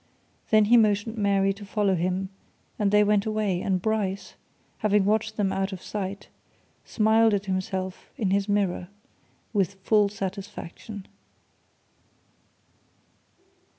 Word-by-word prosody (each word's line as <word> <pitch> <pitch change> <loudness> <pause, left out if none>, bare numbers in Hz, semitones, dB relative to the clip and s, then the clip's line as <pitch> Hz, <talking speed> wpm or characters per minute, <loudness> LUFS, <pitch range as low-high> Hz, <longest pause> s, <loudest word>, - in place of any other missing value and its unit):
Then 215 -1 +5
he 240 +3 +6
motioned 215 0 +2
Mary 200 -2 +2
to 200 +1 -12
follow 205 -1 +1
him, 185 +2 -1 0.5
and 205 -2 +2
they 210 +1 +5
went 210 0 +2
away, 210 -4 0
and 190 -2 0
Bryce, 200 -2 -2 0.5
having 210 -2 +2
watched 220 +1 0
them 195 -2 +1
out 195 +1 -1
of 190 - -6
sight, 200 +1 -5 0.6
smiled 220 0 +3
at 200 0 -3
himself 185 0 -3
in 205 -7 0
his 200 +1 +1
mirror 195 -3 0 0.7
with 195 -2 +1
full 210 -1 +4
satisfaction. 195 0 -7
200 Hz, 120 wpm, -26 LUFS, 190-210 Hz, 0.7 s, he